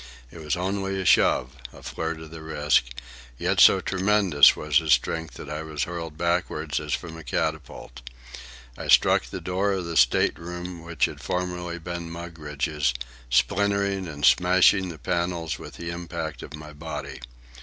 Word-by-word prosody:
It 85 Hz, -, -11 dB
was 75 Hz, -2 st, -1 dB
only 95 Hz, +1 st, -2 dB
a 95 Hz, -, -3 dB
shove, 65 Hz, -4 st, +3 dB, 0.2 s
a -, -, -15 dB
flirt 80 Hz, 0 st, -4 dB
of 80 Hz, -1 st, -11 dB
the 80 Hz, -1 st, -9 dB
wrist, 75 Hz, -6 st, 0 dB, 0.4 s
yet -, -, 0 dB
so -, -, +7 dB
tremendous 95 Hz, -6 st, +4 dB
was 75 Hz, +1 st, +2 dB
his 80 Hz, -2 st, +3 dB
strength 80 Hz, +1 st, -1 dB
that -, -, -9 dB
I 75 Hz, +1 st, -4 dB
was 80 Hz, -2 st, -3 dB
hurled 85 Hz, -3 st, -6 dB
backward 85 Hz, -3 st, -1 dB
as 75 Hz, -1 st, -2 dB
from 80 Hz, -2 st, -8 dB
a 80 Hz, -, -10 dB
catapult. 60 Hz, -1 st, -4 dB, 0.7 s
I -, -, -7 dB
struck -, -, +5 dB
the -, -, -6 dB
door 95 Hz, +2 st, 0 dB
of 95 Hz, -2 st, -3 dB
the 85 Hz, -1 st, -5 dB
state -, -, +3 dB
room 90 Hz, +1 st, -7 dB
which 85 Hz, 0 st, 0 dB
had -, -, -7 dB
formerly 90 Hz, -1 st, -3 dB
been 85 Hz, 0 st, -6 dB
Mugridge's, 75 Hz, -4 st, -3 dB, 0.3 s
splintering 100 Hz, +6 st, +1 dB
and 75 Hz, -2 st, -2 dB
smashing 90 Hz, +2 st, +5 dB
the 85 Hz, -, -8 dB
panels 85 Hz, +1 st, -2 dB
with -, -, -10 dB
the 85 Hz, 0 st, -5 dB
impact 85 Hz, -1 st, -5 dB
of 75 Hz, -, -8 dB
my 75 Hz, 0 st, -11 dB
body. 80 Hz, -2 st, -7 dB
85 Hz, 165 wpm, -25 LUFS, 75-90 Hz, 0.7 s, so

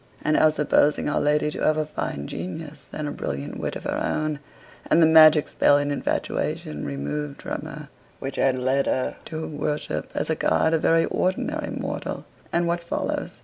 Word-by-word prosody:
And 155 Hz, -, +2 dB
now, 155 Hz, -, +6 dB
supposing 150 Hz, -1 st, +2 dB
our 150 Hz, -, +1 dB
lady 150 Hz, +1 st, +2 dB
to -, -, -5 dB
have 155 Hz, 0 st, +3 dB
a 155 Hz, -, 0 dB
fine 70 Hz, -, -4 dB
genius 145 Hz, -, -7 dB
and 155 Hz, -1 st, -4 dB
a -, -, -3 dB
brilliant 70 Hz, +2 st, -4 dB
wit -, -, -3 dB
of -, -, -6 dB
her -, -, -2 dB
own, 155 Hz, -1 st, -1 dB, 0.5 s
and 165 Hz, -, +5 dB
the 165 Hz, -, +7 dB
magic 155 Hz, -1 st, +7 dB
spell 145 Hz, -, +4 dB
and 145 Hz, 0 st, 0 dB
infatuation 75 Hz, -, -2 dB
removed 70 Hz, +1 st, -4 dB
from -, -, -3 dB
her -, -, -8 dB, 0.3 s
which 135 Hz, -, -6 dB
had 130 Hz, -1 st, +2 dB
led 130 Hz, +2 st, +1 dB
her 130 Hz, -, -1 dB
to 160 Hz, 0 st, -5 dB
worship 150 Hz, 0 st, -3 dB
as -, -, -1 dB
a -, -, +2 dB
god 160 Hz, -, +2 dB
a 165 Hz, -, +3 dB
very 165 Hz, +1 st, +3 dB
ordinary 185 Hz, +1 st, -1 dB
mortal -, -, -4 dB, 0.3 s
and 170 Hz, 0 st, +1 dB
what 170 Hz, 0 st, 0 dB
follows? 170 Hz, -, -3 dB
150 Hz, 190 wpm, -24 LUFS, 130-155 Hz, 0.5 s, the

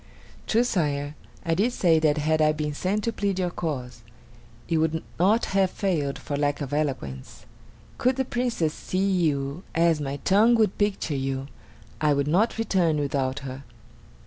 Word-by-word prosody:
"True, 230 Hz, +2 st, +3 dB
Sire, 145 Hz, -10 st, -1 dB, 0.3 s
I 165 Hz, -, +1 dB
did 215 Hz, +9 st, +1 dB
say 165 Hz, -7 st, +3 dB
that 155 Hz, -1 st, +2 dB
had 155 Hz, +1 st, +1 dB
I 155 Hz, 0 st, +4 dB
been 150 Hz, -1 st, -3 dB
sent 195 Hz, +7 st, -1 dB
to 230 Hz, -, -1 dB
plead 200 Hz, -3 st, -1 dB
your 180 Hz, -2 st, 0 dB
cause, 130 Hz, -9 st, -4 dB, 0.7 s
it 165 Hz, -, +1 dB
would 160 Hz, 0 st, 0 dB, 0.2 s
not 205 Hz, +6 st, +3 dB
have 195 Hz, -1 st, +3 dB
failed 160 Hz, -9 st, -1 dB
for 145 Hz, -, -5 dB
lack 145 Hz, 0 st, 0 dB
of 145 Hz, -1 st, -5 dB
eloquence. 130 Hz, -, -3 dB, 0.5 s
Could 255 Hz, +1 st, +2 dB
the 265 Hz, 0 st, 0 dB
Princess 240 Hz, -12 st, -1 dB
see 185 Hz, -, -5 dB
you 150 Hz, -4 st, 0 dB
as 165 Hz, -2 st, +3 dB
my 140 Hz, 0 st, -3 dB
tongue 215 Hz, +9 st, +4 dB
would 215 Hz, -4 st, +1 dB
picture 205 Hz, -6 st, 0 dB
you, 135 Hz, 0 st, -3 dB, 0.5 s
I 150 Hz, -1 st, +4 dB
would 140 Hz, 0 st, 0 dB
not 195 Hz, +10 st, +2 dB
return 185 Hz, -8 st, +1 dB
without 140 Hz, -1 st, -1 dB
her." 135 Hz, 0 st, -7 dB
160 Hz, 170 wpm, -25 LUFS, 145-195 Hz, 0.7 s, I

